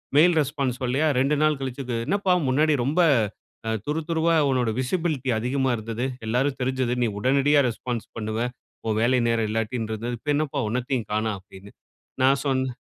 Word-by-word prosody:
Mail 170 +3 +6
response 135 -3 -2
சொல்லலையா, 135 +5 +1
2 140 +3 +2
நாள் 155 -2 +2
கழிச்சுது 130 -2 -4
"என்னப்பா 200 -2 +2 0.2
முன்னாடி 150 +4 +3
ரொம்ப, 155 +6 0 0.7
அ - - 0 0.2
துரு 150 +2 -1
துருவா 165 0 +2
உன்னுடைய 125 -4 +1
விசிபிலிட்டி 145 -2 -1
அதிகமா 130 +2 0
இருந்தது. 115 +3 -3 0.2
எல்லாருக்கும் 130 +4 0
தெரிஞ்சது. 130 -1 0
நீ - - +2
உடனடியா 140 +4 +3
ரெஸ்பான்ஸ் 120 0 -4
பண்ணுவ. 110 0 -3 0.5
உன் 110 - 0
வேலை 125 +2 +3
நேரம் 115 -1 +1
இல்லாட்டின்றது. 110 +1 -2
இப்ப 145 - -2
என்னப் 150 -1 -1
பா 140 - +1
ஒன்னத்தையும் 125 -1 -2
காணோம்!" 110 -1 0
அப்படின்னு. 95 +1 -14 0.5
நான் 135 +1 +4
சொன்னேன் 130 -2 0
130 Hz, 160 wpm, -25 LUFS, 115-145 Hz, 0.7 s, Mail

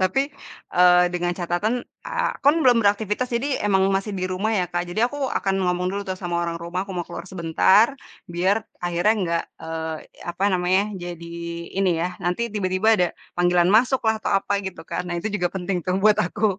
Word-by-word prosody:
tapi 190 +9 +2 0.5
e 180 - +2 0.3
dengan 175 0 0
catatan 200 +8 -1 0.2
aku - - -2
kan 285 +2 +6
belum 245 -3 +5
beraktivitas, 210 +4 +1
jadi 260 +4 -1
emang 195 -2 +3
masih 195 +2 -1
di 185 - -1
rumah 185 +4 -1
ya 180 - +1
Kak. 175 0 -2
Jadi 210 - -4
aku 275 0 -3
akan 195 -1 0 0.2
ngomong 180 0 -1
dulu 200 - -2
tuh 185 0 -3
sama 175 -2 -4
orang 170 0 -3
rumah, 170 +2 -3
aku 195 - -9
mau 175 - -3
keluar 180 +2 -8
sebentar 190 - +3 0.3
biar 190 +6 0 0.2
akhirnya 175 +4 +2
enggak, 170 -2 0 0.2
eee, 160 0 -4 0.3
apa 175 +3 -2
namanya 185 +1 +2 0.2
jadi 170 -1 -7 0.5
ini 190 -2 +3
ya, 180 - 0
nanti 180 +7 -1
tiba-tiba 195 0 0
ada 180 - +4 0.3
panggilan 175 0 +3
masuk 245 +5 +4
lah, 220 -1 +2
atau 205 - -1
apa 200 +1 +1
gitu 190 - -6
kan. 180 +2 -4
Nah, 175 - -3
itu 180 +5 -2
juga 190 -4 0
penting 185 0 -2
tuh 185 - +1
buat 215 0 +5
aku. 205 0 0
185 Hz, 195 wpm, -23 LUFS, 175-215 Hz, 0.5 s, kan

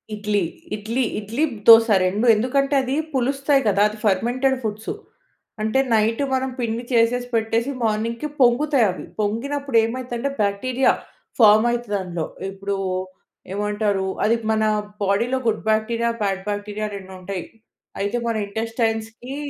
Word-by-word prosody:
ఇడ్లీ. 210 -1 0 0.3
ఇడ్లీ 220 +5 -2 0.2
ఇడ్లీ, 220 +8 -2 0.2
దోస 225 0 +9 0.2
2 200 +6 0
ఎందుకంటే 275 +5 +1
అది 260 0 -3 0.2
పులుస్తాయి 275 +2 +2
కదా! 200 -1 +3
అది 215 - -9
ఫెర్మెంటెడ్ 245 +7 +2
ఫుడ్సు. 215 0 -3 0.7
అంటే 220 +5 +1
నైట్ 225 +3 +2
మనం 265 0 0
పిండి 235 0 -2
చేసేసి, 240 +1 +2
పెట్టేసి 225 +3 0
మార్నింగ్‌కి 230 +5 -1
పొంగుతాయవి. 245 - +3
పొంగినప్పుడు 260 +5 -1
ఏమైదంటే 245 +2 -3
బ్యాక్టీరియా 240 +6 +2 0.5
ఫార్మ్ 215 0 +7
అయితది 235 -4 -2
అందులో. 175 -3 -4 0.3
ఇప్పుడు 195 +1 -4 0.8
ఏమంటారు 205 -1 0 0.2
అది 225 +2 +3 0.2
మన 220 0 +1 0.4
బాడీలో 225 +6 +1
గుడ్ 220 -1 0
బ్యాక్టీరియా, 230 +2 +1
బ్యాడ్ 195 -2 0
బ్యాక్టీరియా 205 +1 -3
2 190 -1 -9
ఉంటాయి. 185 -1 -5 0.6
అయితే 205 +4 -1
మన 230 - 0
ఇంటెస్టైన్స్‌కి 225 +3 -3
225 Hz, 125 wpm, -22 LUFS, 205-245 Hz, 0.8 s, దోస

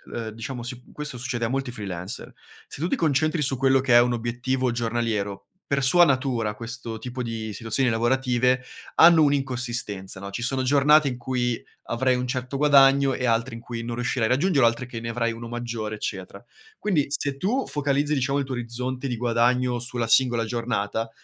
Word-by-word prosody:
ehm, 115 -2 -4
diciamo 115 +3 -6
si 125 +1 -6
questo 150 -4 -3
succede 120 -1 -3
a 115 - 0
molti 135 -1 -2
freelancer: 100 -2 -6 0.4
se 145 - -8
tu 170 - +1
ti - - +1
concentri 155 - +1
su 135 -2 +1
quello 135 0 +3
che 130 -3 +3
è 120 - +9
un 120 0 +1
obiettivo 125 +2 -1
giornaliero, 115 -4 -2 0.2
per 140 -1 0
sua 175 +7 +6
natura, 125 -6 0
questo 115 -1 -7
tipo 125 +2 -6
di 115 -2 -4
situazioni 115 +4 +1
lavorative 125 +2 +1 0.3
hanno 165 -1 +7
un'inconsistenza, 120 -9 -2
no? 100 - -6
Ci 115 - -5
sono 130 +2 -1
giornate 145 +2 +5
in 125 - -5
cui 125 -1 -2 0.3
avrai 130 +2 +2
un 125 0 -2
certo 130 +1 -3
guadagno 140 -2 +5
e 130 - -2
altre 115 +1 0
in 115 - -9
cui 115 -1 -6
non 115 0 -4
riuscirai 120 -1 0
a - - -1
raggiungerlo, 140 -2 +3
altre 115 +2 -1
che 120 -2 -7
ne 115 - -5
avrai 115 0 -1
uno 115 +1 -7
maggiore, 115 -2 -4
eccetera. 100 0 -6 0.3
Quindi 170 -9 0
se 140 0 -2
tu 220 - -1
focalizzi, 145 0 0
diciamo, 135 0 0
il 140 - -1
tuo 130 - -5
orizzonte 125 +2 -4
di 120 -2 -3
guadagno 120 +1 +1
sulla 120 -1 -1
singola 120 -1 +3
giornata, 115 -1 -2
125 Hz, 190 wpm, -24 LUFS, 115-135 Hz, 0.4 s, è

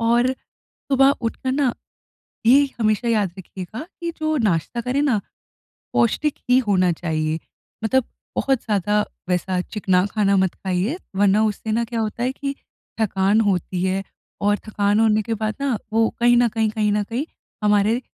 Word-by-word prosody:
और 235 +2 +3 0.4
सुबह 270 0 +2
उठ 230 -2 -2
कर 260 -1 -2
ना, 270 -3 +1 0.7
ये 275 +4 +6
हमेशा 215 +1 +1
याद 210 -5 +1
रखिएगा 190 - -7 0.2
कि 340 0 -2
जो 310 0 0
नाश्ता 175 +6 -1
करें 250 +4 0
ना, 265 -8 +2 0.7
पौष्टिक 285 +6 +1
ही 250 - +6
होना 185 -3 +3
चाहिए। 160 -1 -2 0.5
मतलब 260 +3 +2 0.3
बहुत 270 -3 +1
ज़्यादा 210 0 +1 0.2
वैसा 180 0 0
चिकना 185 -2 +1
खाना 200 -1 +2
मत 190 -2 +2
खाइए, 190 - -2 0.2
वरना 205 +1 +4
उससे 215 +1 -2
ना 235 +2 +1
क्या 230 0 -3
होता 220 +2 -3
है 255 +1 +1
कि 275 0 -4 0.5
थकान 200 0 +2
होती 185 -3 0
है, 190 +1 0 0.4
और 205 0 +2
थकान 205 0 +2
होने 215 -1 +3
के 225 +2 -2
बाद 215 0 -2
ना 275 -4 +1 0.2
वो 225 0 +3
कहीं 240 0 +5
न 240 -1 +4
कहीं, 220 0 0
कहीं 210 -1 0
न 210 0 +1
कहीं 230 +8 -3 0.4
हमारे 210 +3 +3
215 Hz, 165 wpm, -22 LUFS, 195-240 Hz, 0.7 s, ये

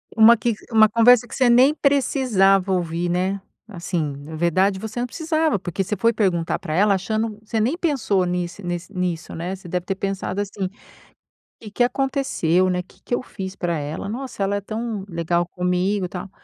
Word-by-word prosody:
Uma 225 +1 +8
que 235 +1 0 0.2
uma 220 -1 +6
conversa 240 +2 +5
que 265 - -8
você 255 -2 +3
nem 255 +5 +6
precisava 230 -10 +2
ouvir, 175 -1 -1
né. 190 +2 -1 0.3
Assim, 175 -3 -3 0.2
na 150 +3 -9
verdade, 185 +4 +2
você 220 +2 -5
não 245 - -1
precisava 315 -2 0
porque 180 +1 -4
você 210 - -2
foi 230 +5 +3
perguntar 185 -7 0
pra 155 -5 -5
ela, 200 +2 +4
achando 215 +2 -2
você 220 0 -3
nem 255 +10 +1
pensou 250 - +1
nisse 175 +2 -3
nesse 175 +2 -4
nisso, 180 -2 -3
né. 175 +3 -4
Você 185 -2 -13
deve 180 +1 -3
ter 195 - -2
pensado, 195 0 -3
assim: 195 -2 -4 0.9
"Que 215 -3 -10
que 245 - +2
aconteceu, 245 - +1
né? 180 0 0
Que - - -24
que 245 - -1
eu - - -4
fiz 190 -4 -7
pra 170 -3 -2
ela? 150 +5 -5
Nossa 245 -3 -4
ela 200 +1 0
é - - -4
tão 215 -1 -4
legal 170 +1 0
comigo, 180 +2 0
tal". 180 +1 -7
195 Hz, 190 wpm, -22 LUFS, 180-230 Hz, 0.9 s, Uma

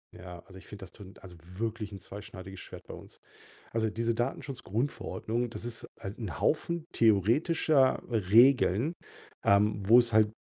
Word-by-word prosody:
Ja, 90 -1 -10
also, 95 0 -13
ich - - -17
finde, 105 -1 -10
das 95 - -11
tut 95 -2 -14
also, 90 -2 -12 0.2
wirklich 110 -1 -3
'n 100 - -8
zweischneidiges 95 0 -10
Schwert - - -10
bei - - -8
uns. - - -12 0.5
Also, 110 -1 0
diese 115 +2 -1
Datenschutzgrundverordnung, 120 -1 -3
das 115 - -7
ist 120 -1 -5
halt 95 +4 -7
'n 105 -7 -5
Haufen 170 +1 0
theoretischer 130 - +3
Regeln, 115 - +4 0.5
ähm, 105 +1 +3
wo 115 - +8
es 120 -1 +3
halt, 110 -1 +4
110 Hz, 155 wpm, -29 LUFS, 100-120 Hz, 0.5 s, wo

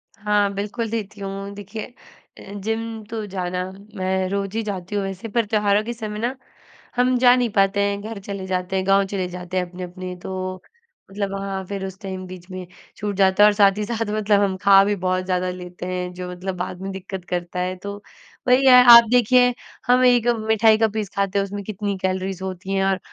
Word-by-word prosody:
हाँ, 205 -1 +1
बिल्कुल 210 +3 -3
देती 215 -2 -5
हूँ, 195 0 -5
देखिए 205 +2 -7 0.5
अ, 200 - -11
जिम 225 0 -3
तो 220 -2 -4
जाना 180 -1 -3 0.2
मैं 190 -1 0
रोज 200 +1 -3
ही 225 - 0
जाती 195 -2 -5
हूँ 200 - 0
वैसे, 195 +2 -5
पर 230 +1 0
त्योहारों 210 -1 +2
के 235 +2 -4
समय 215 -2 -6
ना 240 +4 -1 0.6
हम 250 +1 +3
जा 245 0 +7
नहीं 245 -2 +1
पाते 195 0 +3
हैं, 200 0 -1
घर 215 0 -6
चले 195 -1 -6
जाते 185 0 -2
हैं, 190 0 0
गाँव 195 0 +4
चले 190 -2 -3
जाते 180 0 -5
हैं 180 - +1
अपने-अपने 180 0 -7
तो, 185 0 -4 0.6
मतलब 200 0 -3
वहाँ 195 -1 -4
फिर 195 0 -4
उस 190 0 -8
टाइम 190 -2 -6
बीच 180 0 -11
में 185 0 -6 0.3
छूट 205 -1 -3
जाता 190 +1 +4
है - - +9
और - - +1
साथ 200 -1 +4
ही 210 - -1
साथ 225 -1 -2
मतलब 205 -1 +3
हम 195 -2 +1
खा 195 -1 +7
भी 205 0 +1
बहुत 185 0 0
ज़्यादा 185 0 0
लेते 180 0 -8
हैं 180 0 -3
जो 180 0 -6
मतलब 185 +1 -5
बाद 180 0 -5
में 195 0 -4
दिक्कत 190 -1 -7
करता 175 0 -3
है। 180 +1 -1
तो 200 0 -5 0.5
वही 255 +2 +5
है 250 -1 +9
आप 235 0 +11
देखिए 245 +1 +5 0.3
हम 250 +1 +5
एक 245 -2 +4 0.2
मिठाई 220 0 +5
का 225 0 +3
पीस 210 -2 -4
खाते 200 0 0
हैं - - +1
उसमें 200 +1 -6
कितनी 205 0 -3
कैलोरीज़ 190 0 -2
होती 190 0 -5
हैं 195 0 +1
और 195 0 +1
195 Hz, 215 wpm, -22 LUFS, 185-215 Hz, 0.6 s, आप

